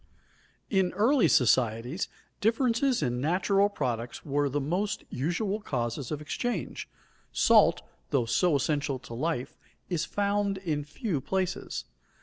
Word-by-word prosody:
In 190 -3 +2
early 225 - +4
societies 125 - +2 0.3
differences 235 - +2
in 125 -2 -1
natural 195 +6 +2
products 125 - -3
were 145 -1 +1
the 145 +2 -1
most 180 +8 -1
usual 185 - -1
causes 120 - -3
of 150 -1 -3
exchange. 230 +4 -3 0.4
Salt, - - +5 0.3
though 130 -4 +2
so 160 +8 +2
essential 145 0 0
to 125 -2 -11
life, 140 +1 -2 0.4
is 165 -3 0
found 200 -1 0
in 160 -6 -2
few 150 - -3
places. 190 0 -2
160 Hz, 125 wpm, -28 LUFS, 135-200 Hz, 0.4 s, Salt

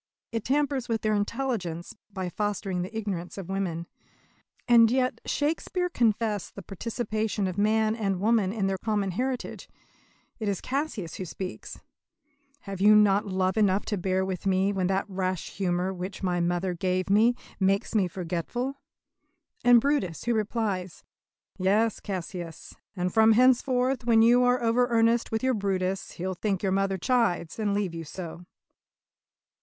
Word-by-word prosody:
It 225 -2 -2
tampers 275 -2 0
with 225 -1 0
their 215 0 +2
intelligence 205 -6 -2 0.2
by 190 -2 -4
fostering 195 -1 -2
the 200 +5 -5
ignorance 190 -5 -4
of 190 -2 -7
women. 175 -4 -2 0.8
And 230 -2 +7
yet 255 +1 0
Shakespeare 330 +4 -1
confessed 220 - 0
the 200 - -8
participation 215 +1 -2
of 185 -2 -2
man 215 +2 +2
and 195 -5 -1
woman 210 -2 +2
in 210 -2 -1
their 195 -1 -1
common 205 -3 -1
heritage. 255 +6 -3 0.7
It 215 - -3
is 195 - -1
Cassius 255 - -3
who 185 - -4
speaks: 185 +2 -7 0.8
"Have 195 -2 -7
you 210 +1 +7
not 210 0 +4
love 185 +1 0
enough 200 -2 +2
to 210 - -2
bear 190 +1 0
with 190 0 -4
me 190 +1 +2
When 185 -2 0
that 195 +1 0
rash 185 -2 -3
humour 185 0 0
which 185 +2 -6
my 180 -1 +1
mother 175 +1 0
gave 185 +1 -1
me 220 +5 +4 0.2
Makes 195 +3 +1
me 200 -5 +3
forgetful?" 185 - -4 0.8
And 245 -1 +7
Brutus 230 - 0
who 240 - +1
replies: 210 -5 -2 0.6
"Yes, 210 +4 +2
Cassius, 175 -3 -6 0.2
and 180 -1 -2
from 220 0 +6
henceforth 255 +1 +3
When 225 -2 +5
you 240 +2 +6
are 245 0 +2
over 240 +2 +3
earnest 230 0 +2
with 225 +2 -1
your 260 0 +2
Brutus 195 -2 -2
He'll 185 +1 -3
think 195 +1 -2
your 195 - +1
mother 195 0 +1
chides, 215 -5 0
and 205 -2 0
leave 200 -4 -1
you 165 0 -5
so." 170 +2 -8
200 Hz, 155 wpm, -27 LUFS, 185-230 Hz, 0.8 s, And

